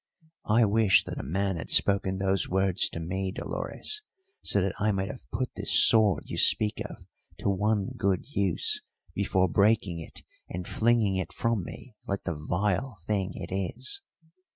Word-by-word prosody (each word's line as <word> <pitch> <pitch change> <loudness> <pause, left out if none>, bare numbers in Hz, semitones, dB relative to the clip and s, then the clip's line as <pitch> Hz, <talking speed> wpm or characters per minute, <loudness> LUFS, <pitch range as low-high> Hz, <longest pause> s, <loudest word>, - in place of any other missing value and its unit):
I 115 +2 +5
wish 105 -1 +4
that - - -6
a - - -5
man 95 +2 -1
had 80 - -7
spoken 95 -1 +3
those 95 -1 0
words 95 0 +2
to - - -6
me, 95 +3 -3
Dolores, 425 - -3 0.4
so 100 - +1
that 95 0 0
I 105 +1 +2
might 95 0 -2
have 130 - -14
put 125 +4 -3
this - - +5
sword 110 -4 +4
you - - -4
speak 105 -1 +4
of - - -10 0.3
to 100 - 0
one 100 0 0
good 95 -2 0
use 100 - 0 0.3
before 95 -1 +1
breaking 100 -2 +2
it 80 - -10 0.3
and 90 0 -6
flinging 110 -4 +2
it 95 - -3
from 115 -4 -1
me 120 +7 -10
like 100 0 -3
the 85 - -2
vile 100 - -2
thing 100 -3 -1
it - - -7
is! 100 - -4
100 Hz, 170 wpm, -27 LUFS, 95-105 Hz, 0.4 s, I